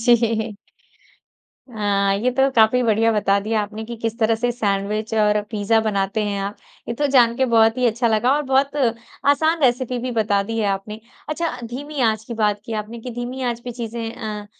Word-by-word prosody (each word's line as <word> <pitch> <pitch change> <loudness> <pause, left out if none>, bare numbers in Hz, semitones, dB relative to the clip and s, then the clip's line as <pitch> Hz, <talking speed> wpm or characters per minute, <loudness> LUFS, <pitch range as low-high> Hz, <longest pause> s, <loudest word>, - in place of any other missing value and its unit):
जी। 230 -2 +2 1.2
हाँ। 200 -2 +1
ये 240 +5 +1
तो 265 +2 +2
काफ़ी 225 +3 +5
बढ़िया 225 0 +3
बता 200 -1 +2
दिया 215 +1 0
आपने 215 +2 -6
कि 235 +1 -7
किस 225 +1 -4
तरह 225 0 +3
से 245 +2 -1
सैंडविच 210 -1 -2
और 210 -1 +3
पिज़्ज़ा 215 0 +1
बनाते 205 0 -1
हैं 200 -1 -2
आप। 200 +1 -4 0.3
ये 235 - -2
तो 290 +4 0
जान 240 -3 +5
के 265 - +2
बहुत 225 -1 +3
ही 250 - +3
अच्छा 235 +1 +1
लगा 225 +4 +2
और 295 - 0
बहुत 275 +2 +2 0.5
आसान 315 +2 +2
रेसिपी 250 0 +1
भी 250 +1 -3
बता 210 -3 +1
दी 225 +3 -4
है 215 - +1
आपने। 200 +2 -4 0.3
अच्छा, 330 +2 -2
धीमी 280 +5 -6
आँच 220 -2 +1
की 235 - -6
बात 210 -2 +1
की 230 - -6
आपने, 215 +2 -4
कि 250 - -7
धीमी 245 +2 -5
आँच 240 -2 -2
पे 245 - -4
चीज़ें 230 -1 -5
अ, 210 -2 -6
225 Hz, 200 wpm, -21 LUFS, 210-245 Hz, 1.2 s, काफ़ी